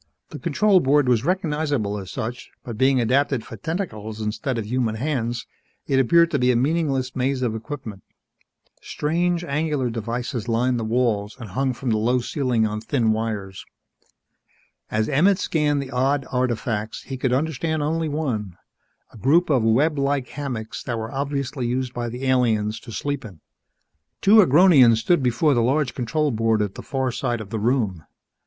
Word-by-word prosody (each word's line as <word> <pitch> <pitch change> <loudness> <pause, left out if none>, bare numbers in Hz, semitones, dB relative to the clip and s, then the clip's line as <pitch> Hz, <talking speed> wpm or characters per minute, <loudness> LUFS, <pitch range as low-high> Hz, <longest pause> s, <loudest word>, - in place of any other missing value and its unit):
The - - -8
control 210 -3 +3
board 145 -2 +3
was 120 -2 +3
recognizable 150 - -1
as 95 -2 -8
such, 120 +5 -5
but 120 - -6
being 130 +3 +3
adapted 130 0 +1
for - - -9
tentacles 110 - -5
instead 115 +5 -2
of 110 - -3
human 115 -1 -1
hands, 120 -2 -2 0.4
it 135 -1 +2
appeared 170 +6 +4
to 145 - +1
be 125 0 +3
a - - +1
meaningless 135 -1 0
maze 130 0 0
of 120 -3 0
equipment. 110 -4 -7 0.8
Strange, 170 +3 -1
angular 150 -5 -1
devices 120 +1 -4
lined 120 +2 +1
the - - -3
walls 110 -3 0
and 115 -5 -8
hung 130 +5 0
from 120 +1 -3
the 110 - +1
low 120 +4 +2
ceiling 125 -2 0
on 105 0 -3
thin 115 -1 +1
wires. 105 -4 -3 1.3
As 110 0 0
Emmett 180 +8 +3
scanned 150 -6 0
the 135 - -10
odd 135 +2 +1
artifacts, 120 -4 -2
he 135 - -6
could 130 -1 -1
understand 155 +3 -1
only 160 +1 -1
one 115 - -3 0.6
a - - -12
group 160 - +3
of 130 -4 +3
web 140 +7 +2
like 140 -2 0
hammocks 125 -7 -5
that 120 -3 -3
were 110 +1 -5
obviously 140 -2 -2
used 125 +1 -2
by 120 -1 -3
the 125 +3 -6
aliens 110 -5 +1
to 115 - -11
sleep 140 +4 -3
in. 95 -8 -11 0.8
Two 205 +3 +5
Agronians 145 - +6
stood 145 +9 +2
before 130 +4 +2
the 120 - +2
large 135 +4 +1
control 145 +4 -1
board 110 -1 +1
at 100 -2 -4
the - - -8
far 130 -2 -2
side 120 0 -2
of 105 -2 -9
the 110 - -2
room. 105 -7 0
125 Hz, 175 wpm, -23 LUFS, 115-145 Hz, 1.3 s, Agronians